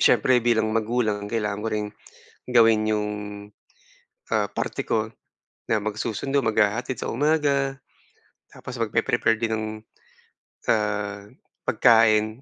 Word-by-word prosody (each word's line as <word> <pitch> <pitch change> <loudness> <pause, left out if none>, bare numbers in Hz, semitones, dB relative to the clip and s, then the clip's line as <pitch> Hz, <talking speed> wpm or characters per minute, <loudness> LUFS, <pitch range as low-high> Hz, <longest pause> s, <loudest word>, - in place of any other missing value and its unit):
siyempre 130 -1 +4
bilang 110 -2 +2
magulang 110 -2 0
kailangan 105 -2 -2
ko - - 0
ring, 105 -1 -1 0.6
gawin 115 -3 +5
'yong, 105 -1 0 1.2
ah, - - +2
parte - - -3
ko 110 0 0 0.6
na 110 - +3
magsusundo, 110 +6 -1
maghahatid 110 +3 +1
sa - - -3
umaga. 140 -1 +1 0.7
Tapos 130 - -9
mag-pre-prepare 115 +1 +1
din 115 -1 -1
ng, 110 0 -3 1.0
ah, 105 -2 0 0.4
pagkain 110 0 +4
110 Hz, 105 wpm, -24 LUFS, 105-120 Hz, 1.2 s, gawin